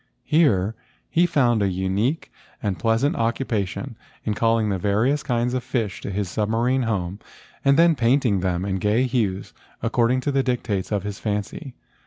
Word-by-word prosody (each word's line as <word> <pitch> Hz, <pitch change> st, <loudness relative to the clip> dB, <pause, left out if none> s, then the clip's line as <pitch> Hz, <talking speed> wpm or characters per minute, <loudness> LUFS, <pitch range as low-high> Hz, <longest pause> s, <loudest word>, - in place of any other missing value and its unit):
Here 115 Hz, -, +3 dB, 0.4 s
he 175 Hz, +2 st, +4 dB
found 125 Hz, -9 st, +2 dB
a 100 Hz, -, +2 dB
unique 95 Hz, -, -1 dB, 0.3 s
and 100 Hz, -6 st, -2 dB
pleasant 115 Hz, -, +1 dB
occupation 115 Hz, -, -2 dB, 0.3 s
in 110 Hz, -, -1 dB
calling 115 Hz, 0 st, +2 dB
the 95 Hz, -2 st, -1 dB
various 110 Hz, +10 st, +1 dB
kinds 125 Hz, -3 st, -1 dB
of 130 Hz, -1 st, -1 dB
fish 115 Hz, -7 st, -2 dB
to -, -, -5 dB
his 100 Hz, 0 st, -2 dB
submarine 115 Hz, +7 st, 0 dB
home 95 Hz, -2 st, -2 dB, 0.4 s
and 140 Hz, 0 st, +4 dB
then 165 Hz, 0 st, +5 dB
paint¬ 130 Hz, +2 st, +2 dB
ing 100 Hz, -5 st, +2 dB
them 90 Hz, 0 st, -1 dB
in 95 Hz, -1 st, -1 dB
gay 105 Hz, +6 st, +2 dB
hues 110 Hz, -7 st, -1 dB, 0.3 s
according 125 Hz, +2 st, +2 dB
to 145 Hz, -, -1 dB
the 135 Hz, -1 st, +2 dB
dictates 120 Hz, -7 st, -2 dB
of 100 Hz, -2 st, 0 dB
his 105 Hz, -1 st, -5 dB
fancy. 105 Hz, +6 st, -4 dB
115 Hz, 170 wpm, -23 LUFS, 100-130 Hz, 0.4 s, then